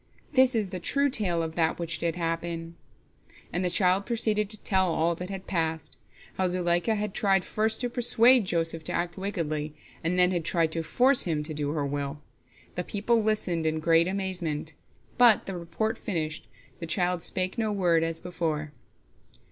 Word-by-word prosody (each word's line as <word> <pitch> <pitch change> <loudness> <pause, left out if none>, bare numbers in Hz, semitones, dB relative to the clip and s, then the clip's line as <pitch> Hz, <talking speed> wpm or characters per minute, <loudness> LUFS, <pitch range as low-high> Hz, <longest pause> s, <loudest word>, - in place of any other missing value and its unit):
This 260 -2 +4
is 210 -4 -1
the 185 - -4
true 280 +9 +1
tale 175 -8 +1
of 160 -1 -5
that 165 -1 0
which 165 -2 -3
did 165 -1 -1
happen," 165 0 -4 0.8
and 180 - -1
the 180 - +1
child 185 +2 +2
proceeded 215 -3 0
to 215 -1 -2
tell 190 -3 +2
all 165 +1 +1
that 180 +2 -7
had 195 -1 -6
passed—how 160 +2 -4
Zuleika 175 +4 +1
had 210 -1 -3
tried 195 -3 +2
first 220 +2 0
to 245 - 0
persuade 240 -1 +4
Joseph 165 -2 -1
to - - -1
act 175 0 -2
wickedly, 155 -6 -3 0.3
and 170 +3 0
then 180 0 +4
had 175 -3 -1
tried 165 -1 +1
to 165 - -2
force 250 - +4
him 155 -4 -1
to 155 +1 -5
do 145 -1 -2
her 150 -3 -1
will. 140 +1 -4 0.5
The 180 - -3
people 220 +5 0
listened 190 -7 0
in 155 0 -1
great 165 +1 +3
amazement. 180 -5 -3 0.5
But 240 -4 +6
the 195 - -5
report 175 +6 -3
finished, 160 -6 -3 0.3
the 165 - -6
child 180 +1 +1
spake 185 +5 0
no 220 -2 0
word, 175 -5 +2
as 165 0 -2
before. 160 -4 -3
175 Hz, 180 wpm, -27 LUFS, 165-205 Hz, 0.8 s, But